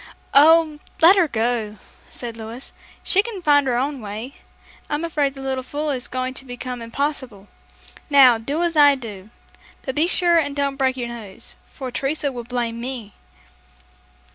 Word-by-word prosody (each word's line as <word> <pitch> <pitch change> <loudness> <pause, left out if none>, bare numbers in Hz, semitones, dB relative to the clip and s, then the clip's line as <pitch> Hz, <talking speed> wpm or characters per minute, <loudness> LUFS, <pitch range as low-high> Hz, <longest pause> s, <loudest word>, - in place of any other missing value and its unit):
"Oh, 310 +1 +6 0.2
let 340 +4 +8
her 365 -4 +3
go!" 225 -3 -1 0.3
said 235 -2 -6
Louis. 230 +3 -9 0.3
"She 390 - +4
can 415 -4 -7
find 285 -3 +4
her 245 -2 +1
own 275 +1 -2
way. 215 +6 -7 0.6
I'm 295 +2 -2
afraid 295 -4 -1
the 270 - -9
little 265 -1 -2
fool 295 +3 -3
is 250 -3 -2
going 255 0 -3
to 260 - -5
become 250 -1 -6
impossible. 240 -4 -3 0.6
Now, 260 -5 +7
do 285 +9 -2
as 340 -1 0
I 290 -2 +7
do. 215 -6 -9 0.5
But 265 - -3
be 310 +5 +3
sure 350 -2 +4
and 285 -3 -2
don't 280 -1 -1
break 265 -1 +1
your 240 -1 -3
nose, 220 -5 -8 0.2
for 260 -3 -7
Teresa 280 +3 -1
will 240 -2 -7
blame 235 -1 -3
me." 240 -5 -6
265 Hz, 165 wpm, -21 LUFS, 240-295 Hz, 0.6 s, let